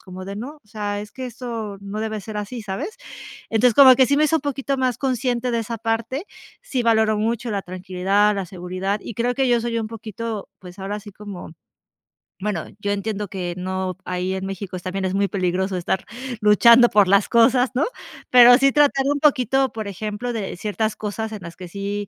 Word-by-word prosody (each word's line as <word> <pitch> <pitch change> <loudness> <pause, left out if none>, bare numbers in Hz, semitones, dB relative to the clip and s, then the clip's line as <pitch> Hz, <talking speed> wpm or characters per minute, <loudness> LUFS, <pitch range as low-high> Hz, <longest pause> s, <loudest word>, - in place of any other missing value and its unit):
como 185 0 -9
de: 200 +1 -6
"No, 275 +8 -7
o - - -30
sea, 205 -1 -3
es 210 0 -9
que 260 -1 -6
esto 230 -4 -6
no 200 +1 -6
debe 220 -1 -3
ser 215 -1 -7
así", 215 +3 -5
¿sabes? 280 - -5 0.5
Entonces, 225 +1 +3
como 260 -3 +9
que 260 - +5
sí 280 - +2
me 305 - +4
hizo 320 +2 +3
un - - -4
poquito 275 -1 -2
más 255 -2 0
consciente 250 -2 -1
de 235 - 0
esa 230 +1 -3
parte, 230 - -2 0.4
sí 260 - -2
valoro 220 -2 +3
mucho 230 +2 -1
la 200 -2 -2
tranquilidad, 190 +3 +1
la 195 -2 -3
seguridad, 185 +3 -3
Y - - -7
creo 245 +2 0
que 265 -1 +1
yo 240 -1 +3
soy 230 0 -2
un 220 -1 -3
poquito, 225 -1 -6
pues, 180 0 -12
ahora 200 +2 -4
sí 205 0 -11
como 200 -4 -9 0.9
bueno, 195 -5 -2
yo 205 0 -2
entiendo 205 0 -3
que 180 -2 -4
no 185 0 -3
ahí 185 +1 -2
en 190 0 -3
México 195 -1 -6
es 180 - -7
también 190 +1 -3
es 185 - -1
muy 200 0 +1
peligroso 185 0 -1
estar 180 +2 -1 0.4
luchando 235 +3 +7
por 205 -3 +4
las 200 +1 +3
cosas, 245 +2 +4
¿no?, 270 - +2 0.4
pero 245 0 +9
sí 275 0 +3
tratar 285 -2 +3
un 285 0 +1
poquito, 270 -2 +3
por 220 -2 -5
ejemplo, 210 +5 -4
de 195 -5 -4
ciertas 215 +2 -2
cosas 220 +1 -4
en 215 - -6
las 170 0 -9
que 180 -2 -9
sí 200 +1 -4
215 Hz, 210 wpm, -22 LUFS, 195-245 Hz, 0.9 s, como